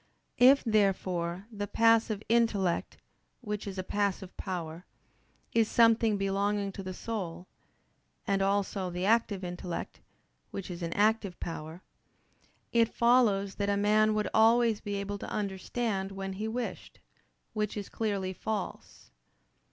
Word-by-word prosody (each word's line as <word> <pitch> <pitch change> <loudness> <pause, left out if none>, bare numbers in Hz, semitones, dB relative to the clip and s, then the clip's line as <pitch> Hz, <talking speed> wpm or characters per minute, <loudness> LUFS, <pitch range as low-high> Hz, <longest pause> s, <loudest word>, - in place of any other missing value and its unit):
If, 265 +3 +7
therefore, 190 -4 0
the 205 -2 -4
passive 225 -1 +3
intellect, 215 -6 +1 0.4
which 210 -3 -4
is 195 -1 -6
a 185 - -2
passive 195 -1 -2
power, 170 -3 -5 0.7
is 225 -2 +3
something 230 -2 +4
belonging 200 +1 0
to 195 - -7
the 185 -1 -5
soul; 180 -7 -5 0.8
and 195 -1 +1
also 195 -1 0
the 180 +1 -3
active 210 -3 +2
intellect, 175 -1 -5 0.5
which 195 -1 -6
is 175 0 -7
an 170 0 -2
active 210 -3 +1
power: 165 +1 -6 0.9
it 230 -1 +3
follows 225 -5 +3
that 200 - +1
a 200 - +2
man 215 +1 +3
would 210 -1 0
always 225 0 +4
be 205 -1 -4
able 200 0 -4
to - - -6
understand 195 0 -2
when 195 0 -4
he 210 +3 -4
wished, 240 +2 -5 0.5
which 210 -1 -2
is 205 - -4
clearly 200 -4 -2
false. 210 - -5
200 Hz, 135 wpm, -30 LUFS, 190-220 Hz, 0.9 s, If